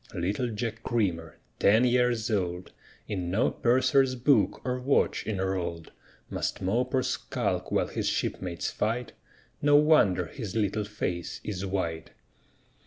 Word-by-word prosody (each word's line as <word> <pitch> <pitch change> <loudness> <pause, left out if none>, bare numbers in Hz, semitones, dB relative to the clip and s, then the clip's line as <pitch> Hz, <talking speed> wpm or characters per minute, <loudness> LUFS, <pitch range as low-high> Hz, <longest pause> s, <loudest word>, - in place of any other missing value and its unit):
Little 100 +8 -1
Jack 115 +1 -4
Creamer, 90 -9 -1 0.2
ten 110 +5 +5
years 120 -2 +2
old, 90 -3 -2 0.4
In 90 -4 -3
no 100 +6 +2
purser's 130 +2 +3
book 130 +3 +3
or 125 0 -1
watch 135 +3 +1
enrolled, 95 -5 -2 0.4
Must - - -3
mope 120 +8 0
or 130 - +2
skulk - - -2
while - - +2
his - - -3
shipmates 90 -2 -2
fight, 115 +2 -2 0.5
No 145 0 +5
wonder 145 - +5
his 110 +2 -7
little 105 -1 0
face 90 -5 -4
is 100 -2 -4
white! 85 -3 -3
105 Hz, 130 wpm, -28 LUFS, 90-125 Hz, 0.5 s, ten